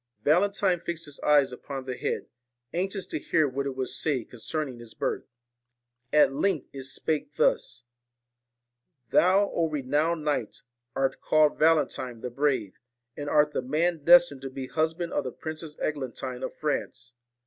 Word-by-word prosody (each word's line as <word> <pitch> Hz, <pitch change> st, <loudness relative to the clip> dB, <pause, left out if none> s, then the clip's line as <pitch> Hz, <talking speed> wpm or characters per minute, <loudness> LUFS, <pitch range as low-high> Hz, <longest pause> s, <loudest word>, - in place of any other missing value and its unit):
Valentine 185 Hz, +3 st, +3 dB
fixed 170 Hz, 0 st, -5 dB
his 145 Hz, -2 st, -11 dB
eyes 145 Hz, -3 st, +4 dB
upon 135 Hz, +1 st, -6 dB
the 130 Hz, -1 st, -3 dB
head, -, -, -2 dB, 0.5 s
anxious 190 Hz, +2 st, -2 dB
to -, -, -4 dB
hear 155 Hz, +1 st, +2 dB
what 140 Hz, +1 st, -2 dB
it 135 Hz, -, -4 dB
would 130 Hz, -1 st, -2 dB
say 140 Hz, -6 st, -1 dB
con 120 Hz, -, -14 dB
cerning 135 Hz, -1 st, -3 dB
his 115 Hz, -1 st, -12 dB
birth. -, -, -2 dB, 0.8 s
At 150 Hz, -3 st, +5 dB
length 155 Hz, +1 st, 0 dB
it 135 Hz, -1 st, -7 dB
spake 155 Hz, -, -2 dB
thus: -, -, +1 dB, 1.3 s
'Thou, 195 Hz, +3 st, +4 dB
O 165 Hz, -1 st, +1 dB
renowned 150 Hz, +3 st, 0 dB
knight, 145 Hz, -7 st, -2 dB, 0.3 s
art 135 Hz, 0 st, 0 dB
called 155 Hz, -1 st, +3 dB
Valentine 140 Hz, -7 st, +2 dB
the 125 Hz, -, -4 dB
Brave, 135 Hz, -5 st, 0 dB, 0.4 s
and 145 Hz, 0 st, -4 dB
art 150 Hz, 0 st, +3 dB
the -, -, 0 dB
man 155 Hz, +4 st, 0 dB
destined 170 Hz, -4 st, +6 dB
to 135 Hz, -, -5 dB
be 130 Hz, 0 st, -6 dB
the -, -, -15 dB
husband 160 Hz, +2 st, 0 dB
of 145 Hz, -, 0 dB
the 130 Hz, -, -4 dB
Princess 155 Hz, +2 st, -7 dB
Eglantine 130 Hz, -3 st, -3 dB
of -, -, -4 dB
France. 120 Hz, -1 st, -3 dB
150 Hz, 160 wpm, -27 LUFS, 130-165 Hz, 1.3 s, destined